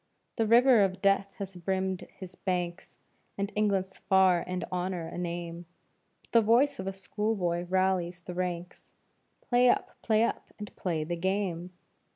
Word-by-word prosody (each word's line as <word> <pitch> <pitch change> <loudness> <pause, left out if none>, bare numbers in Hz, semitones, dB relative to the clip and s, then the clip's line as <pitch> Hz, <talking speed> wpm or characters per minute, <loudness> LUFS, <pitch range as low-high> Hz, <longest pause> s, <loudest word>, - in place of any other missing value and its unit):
The 225 -2 +2
river 240 0 +6
of 190 -1 -1
death 195 0 +2
has 195 -2 -6
brimmed 190 +1 -2
his 185 -2 -9
banks, 180 -1 -3 0.4
And 200 +1 -2
England's 195 -3 0
far 190 -3 +4
and 180 0 -3
Honor 180 -2 -2
a - - -8
name, 170 -1 -5 0.6
But - - -29
the 230 - +6
voice 235 +5 +3
of 190 - -4
a - - 0
schoolboy 190 -3 -2
rallies 185 -1 0
the 180 - -7
ranks, 180 -1 -5 0.5
"Play 245 0 +5
up! - - +1
Play 220 -1 +3
up! - - -2
And 210 -1 -9
play 165 -4 -2
the 175 +3 -3
game!" 185 -1 -1
190 Hz, 160 wpm, -29 LUFS, 175-200 Hz, 0.6 s, river